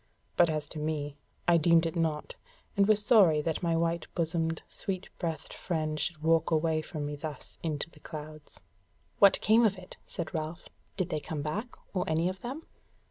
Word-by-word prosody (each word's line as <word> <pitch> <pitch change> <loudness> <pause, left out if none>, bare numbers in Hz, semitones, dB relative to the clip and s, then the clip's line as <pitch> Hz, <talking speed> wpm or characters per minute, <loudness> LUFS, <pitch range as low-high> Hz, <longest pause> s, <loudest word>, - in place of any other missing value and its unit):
But 175 -1 +5
as 155 -1 -1
to 155 - -6
me, 150 -2 -2 0.3
I 175 -1 +6
deemed 165 +1 +5
it 165 - -2
naught, 160 -3 -1 0.4
and 200 0 +4
was 210 -1 +4
sorry 190 -11 +6
that 160 -1 -1
my 165 -2 +1
white 170 0 0
bosomed, 165 -1 0
sweet 190 -3 -5
breathed 165 -4 -3
friend 155 -3 -2
should 155 0 -2
walk 165 0 +3
away 160 -1 +2
from 155 -1 -5
me 145 0 -3
thus 145 0 -8
into 155 -1 -2
the 160 -2 -18
clouds." 155 - -9 0.6
"What 200 -1 +7
came 225 +2 +5
of 205 -3 +3
it?" 185 0 -12
said 170 -3 -5
Ralph, 160 +1 -4 0.3
"did 185 -3 0
they 155 - -1
come 150 0 -4
back, 205 +11 -3 0.2
or 185 -2 +1
any 165 +3 +2
of 185 0 -7
them?" 270 +7 -6
165 Hz, 190 wpm, -30 LUFS, 155-180 Hz, 0.6 s, What